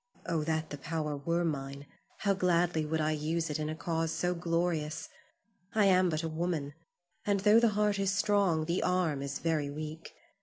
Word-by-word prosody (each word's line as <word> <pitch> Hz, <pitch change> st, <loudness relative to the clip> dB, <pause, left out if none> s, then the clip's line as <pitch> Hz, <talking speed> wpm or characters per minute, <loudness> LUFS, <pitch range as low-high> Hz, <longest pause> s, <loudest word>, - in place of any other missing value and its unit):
Oh, 165 Hz, -3 st, 0 dB
that 160 Hz, 0 st, -1 dB
the 145 Hz, -, -6 dB
power 150 Hz, 0 st, -2 dB
were 170 Hz, +5 st, 0 dB
mine, 140 Hz, -2 st, -3 dB, 0.4 s
how 200 Hz, -1 st, +3 dB
gladly 175 Hz, -4 st, +1 dB
would 160 Hz, +1 st, 0 dB
I 155 Hz, 0 st, +1 dB
use 155 Hz, +1 st, -1 dB
it 150 Hz, -, -2 dB
in 155 Hz, 0 st, -2 dB
a 155 Hz, -, -3 dB
cause 165 Hz, 0 st, -1 dB
so 180 Hz, +2 st, 0 dB
glorious! 170 Hz, -2 st, -1 dB, 0.7 s
I 215 Hz, -2 st, +5 dB
am 185 Hz, -1 st, +5 dB
but 155 Hz, 0 st, -1 dB
a -, -, -1 dB
woman, 160 Hz, -3 st, -2 dB, 0.5 s
and 200 Hz, -1 st, +1 dB
tho' 210 Hz, +3 st, +6 dB
the 235 Hz, -, +4 dB
heart 210 Hz, -1 st, +2 dB
is 195 Hz, -1 st, +1 dB
strong, 195 Hz, -5 st, +2 dB
the 170 Hz, +3 st, 0 dB
arm 175 Hz, -6 st, +1 dB
is 140 Hz, 0 st, -3 dB
very 155 Hz, -3 st, 0 dB
weak. 155 Hz, +2 st, -7 dB
165 Hz, 190 wpm, -31 LUFS, 155-180 Hz, 0.7 s, tho